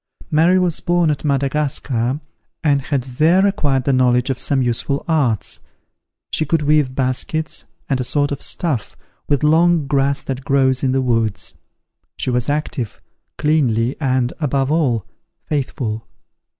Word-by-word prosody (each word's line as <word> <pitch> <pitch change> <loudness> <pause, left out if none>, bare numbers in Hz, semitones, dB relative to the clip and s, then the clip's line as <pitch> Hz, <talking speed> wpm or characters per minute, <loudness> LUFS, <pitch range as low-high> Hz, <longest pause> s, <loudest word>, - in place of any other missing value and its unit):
Mary 165 +4 +4
was 180 -3 +1
born 175 -2 +2
at 145 - -3
Madagascar, 140 -3 0 0.4
and 145 -3 +3
had 135 -1 -1
there 155 +9 +3
acquired 145 -9 +1
the 140 - +1
knowledge 125 0 +3
of 130 - -3
some 140 - 0
useful 130 +3 -1
arts. 140 - 0 0.7
She - - +4
could 155 +1 0
weave 145 -3 +2
baskets, 135 +4 -2 0.2
and 135 -2 0
a - - 0
sort 145 +3 0
of 140 - -4
stuff, 150 - -2 0.3
with 145 -2 +1
long 165 +1 +4
grass 140 0 +1
that 135 0 -4
grows 135 -2 +2
in 130 - +1
the 135 0 +1
woods. 115 -4 -1 0.6
She 130 - -1
was 125 +2 0
active, 145 -6 -3 0.4
cleanly, 130 -6 +1
and, 130 -2 +1
above 140 -2 0
all, 135 - +1 0.4
faithful. 115 -6 -3
140 Hz, 145 wpm, -19 LUFS, 130-150 Hz, 0.7 s, Mary